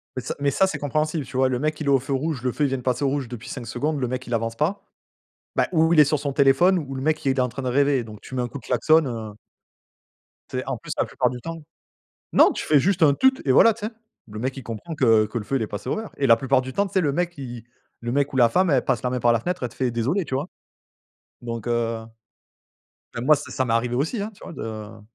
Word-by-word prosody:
Mais 130 - -3
ça - - -4
mais 140 0 +1
ça, 190 +8 +3
c'est 150 -6 -4
compréhensible, 155 +2 -1
tu 130 - -6
vois? 130 0 +3
Le 125 -1 -1
mec 155 +2 -1
il 155 - -4
est - - +3
au 135 -1 +5
feu 135 +2 -4
rouge, 140 0 -1
le 125 - +1
feu 150 - -2
il - - +3
vient 135 - -1
de 125 - -7
passer 125 +2 -1
au - - +3
rouge 140 -2 -2
depuis 120 -1 -8
5 120 -4 -6
secondes, 150 +4 -2
le 125 - -1
mec 130 +1 -4
il 120 - -4
avance 115 0 -1
pas, 165 - -1 0.8
bah, - - +2
ou 160 0 +3
il 155 - +6
est - - +9
sur 150 +1 +1
son 140 0 -3
téléphone, 140 +7 +4
ou 135 -4 -5
le 130 - -4
mec 155 +2 0
il 135 - +1
était 130 0 +1
en 125 - +2
train 125 +3 -6
de 130 - -2
rêver, 140 0 +2
donc 105 -2 -11
tu 130 - -10
mets 125 - 0
un 120 - -2
coup 140 - -7
de - - -16
klaxon 155 +6 +3
heu 110 -3 -5 1.2
Tu - - -4
sais - - -2
en - - -3
plus - - -9
la - - +2
plupart 125 - 0
du 125 0 -6
temps 165 +1 -7 0.7
non - - +6
tu - - -4
fais 150 - +5
juste 180 +4 +1
un 145 -3 +6
«Tut!» 265 - +4 0.2
et - - +6
voilà 230 - +7
tu 210 -1 -5
sais. 225 - -6 0.4
Le 105 - -7
mec 130 +4 -2
il 135 - -7
comprend 115 +9 -6
que 115 -6 +4
que 115 +3 -4
le 105 - -6
feu 135 +5 -1
il 125 - 0
est - - -1
passé 105 - -6
au - - 0
vert, 220 -1 -5
et 140 - +2
la 115 -2 +7
plupart 135 +2 +2
du 130 0 -7
temps 200 - +1
tu 195 - -11
sais 190 - +3
le 150 -5 +1
mec 175 +3 0
qui 130 -7 -8
i 115 - -14 0.4
le 120 0 -3
mec 140 +1 +1
ou - - -4
la 120 -3 +6
femme 185 +8 +2
elle 135 -3 +2
passe 125 -5 0
la 125 - 0
main 125 - -1
par 120 0 +4
la 115 - +1
fenêtre, 180 +7 -3
elle 120 - -3
te - - -17
fait: 130 -2 0
«désolée» 130 - 0
tu - - -4
vois? 140 +6 -2 0.9
Donc 115 -2 -5
heu 115 -1 -1 1.1
bah 115 - -4
moi 150 +5 +5
ça 145 - -8
ça 130 - 0
m'est 115 - 0
arrivé 120 +1 0
aussi, 160 - -1
hein, 210 +2 -4
tu - - -16
vois - - -8
de 110 -5 -7
135 Hz, 305 wpm, -24 LUFS, 120-155 Hz, 1.2 s, est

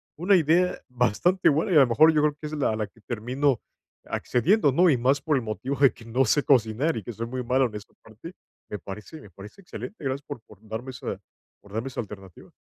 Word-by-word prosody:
una 185 +5 +3
idea 175 +2 +2
bastante 125 - +1
buena. 155 +6 +1
Y, - - +2
a 150 - +8
lo 130 - +5
mejor, 155 +8 +5
yo 150 -1 +2
creo 150 -1 +2
que 150 - -6
es 155 - -8
la 135 -7 0
la 110 -1 -3
que 115 - -25
termino 125 +4 -1 0.4
accediendo, 150 - +2
¿no? 175 +6 +4
Y 135 - +3
más 135 +4 +2
por 155 -1 +1
el 130 - +1
motivo 120 +5 -3
de 140 -2 +5
que 115 - -15
no 125 +4 +1
sé 145 +5 +3
cocinar, 130 +4 +2
y 110 - -5
que 120 - -7
soy 115 +2 -5
muy 125 +1 -4
malo 130 +2 +2
en 105 - -12
esta 105 +1 -10
parte. 110 - -12 0.4
Me 105 - -5
parece 105 - -9
me 105 - -14
parece 100 - -13
excelente. 180 -1 -9
Gracias 135 +1 -2
por 145 -6 -7
por 105 -2 -18
darme 115 +4 -6
esa 125 - -6 0.4
por 100 - -18
darme 115 +4 -3
esa 130 - -7
alternativa. 95 -4 -12
130 Hz, 235 wpm, -25 LUFS, 110-150 Hz, 0.4 s, a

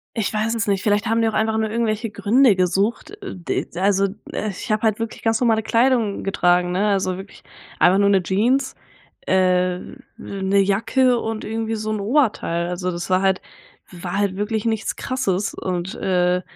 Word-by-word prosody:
Ich 220 -3 -1
weiß 215 +2 0
es 220 -2 -1
nicht. 195 -1 0
Vielleicht 205 -1 +1
haben 225 +1 +2
die 225 - +2
auch - - -6
einfach 220 0 +1
nur 220 0 0
irgendwelche 225 0 -1
Gründe 210 +3 +3
gesucht. 190 - 0
Äh, 390 - -6
d 175 -3 -3
also, 195 +2 +2 0.3
äh, 215 - -2
ich 195 +4 -7
habe 215 0 +1
halt 220 -1 +1
wirklich 230 -1 -5
ganz 225 -1 +2
normale 225 -3 +2
Kleidung 230 -3 +1
getragen, 180 -2 +2
ne, 200 +3 +1
also 190 -2 0
wirklich 195 +1 -12 0.4
einfach 180 +2 +5
nur 200 0 +4
'ne 195 -2 +4
Jeans, 240 +9 +1 0.5
äh, 185 -1 +2 0.4
'ne 195 0 -1
Jacke 225 +6 +2
und 225 -1 -4
irgendwie 225 0 -2
so 215 0 -3
'n 215 -1 -2
Oberteil. 205 - +1
Also 180 +1 -3
das 175 +1 -5
war 185 0 +3
halt 190 -1 +1 0.5
war 180 +2 -5
halt 200 -2 0
wirklich 210 +1 -2
nichts 220 -2 -1
Krasses 210 -7 -1
und, 180 0 -4
äh 180 -1 +1
205 Hz, 185 wpm, -21 LUFS, 185-225 Hz, 0.5 s, einfach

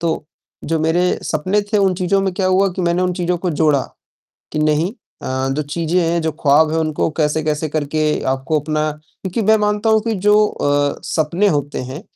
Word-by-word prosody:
तो 160 -2 -1 0.4
जो 165 +1 0
मेरे 175 +3 +1
सपने 185 +7 0
थे 210 - +4
उन 195 -2 +2
चीज़ों 185 +2 +1
में 195 -1 -1
क्या 190 - 0
हुआ 190 +1 +3
कि 185 - -1
मैंने 170 +1 +1
उन 180 0 +1
चीज़ों 180 -1 -1
को 180 +1 -2
जोड़ा, 150 -3 +2 0.7
कि 155 - -2
नहीं 155 +5 +1 0.3
अ, - - -4 0.2
जो 140 +3 -1
चीज़ें 165 +4 -1
हैं, 170 0 0
जो 160 0 -1
ख्वाब 150 +2 +4
हैं 160 - 0
उनको 155 0 0
कैसे-कैसे 155 0 0
करके 155 0 -2 0.3
आपको 135 +4 -1
अपना 155 +1 -1
क्योंकि 155 +7 -6
मैं 220 +2 +5
मानता 210 +1 +1
हूँ 220 0 +4
कि 225 +1 -1
जो 210 - +6
अ, 145 -4 0
सपने 170 +6 +1
होते 145 0 -4
हैं 130 +5 -7
160 Hz, 195 wpm, -18 LUFS, 150-185 Hz, 0.7 s, जो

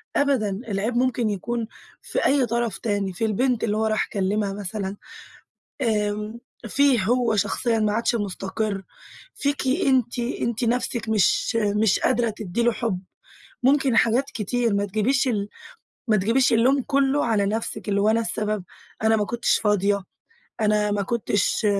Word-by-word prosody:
أبداً، 220 -8 +1
العيب 210 +3 -2
ممكن 245 -2 +1
يكون 225 +3 -3 0.3
في - - -2
أي 275 -2 +3
طرف 235 -3 -1
تاني 205 -4 -2
في 225 - -1
البنت 240 +3 0
اللي 210 -1 0
هو 220 - +1
راح 215 -1 0
كلمها 200 +1 0
مثلًا، 200 0 -4 0.8
آمم 210 -1 -1 0.3
فيه 270 -2 +3
هو 240 +1 +2
شخصيًا 230 +2 0
ما 210 -1 +1
عادش 230 +2 +1
مستقر، 200 -1 -3 0.5
فيكِ 280 -1 -1
أنتِ، 255 -2 +1
أنتِ 235 -1 -2
نَفسك 235 -1 -1
مش 220 +2 +2
مش 210 -1 +2
قادرة 240 -2 +1
تدي 215 +1 -3
له 240 - +4
حب. 225 -5 -2 0.6
ممكن 270 -2 +3
حاجات 235 +4 +3
كتير 230 0 -1
ما 200 - +1
تجيبيش 220 +7 +1
ال 205 -4 -1 0.6
ما 215 -2 +4
تجيبيش 230 +7 +2
اللوم 260 +4 +3
كله 275 +1 +1
على 215 -4 +1
نفسك، 220 +1 -3
اللي 200 0 +1
هو 210 - +3
أنا 225 +1 +3
السبب، 215 -3 -2 0.4
أنا 220 0 +4
ما 210 - 0
كنتش 240 +2 +1
فاضية، 205 -1 +1 0.6
أنا 210 -1 +2
ما 205 0 0
كنتش 210 0 0
220 Hz, 150 wpm, -24 LUFS, 205-240 Hz, 0.8 s, له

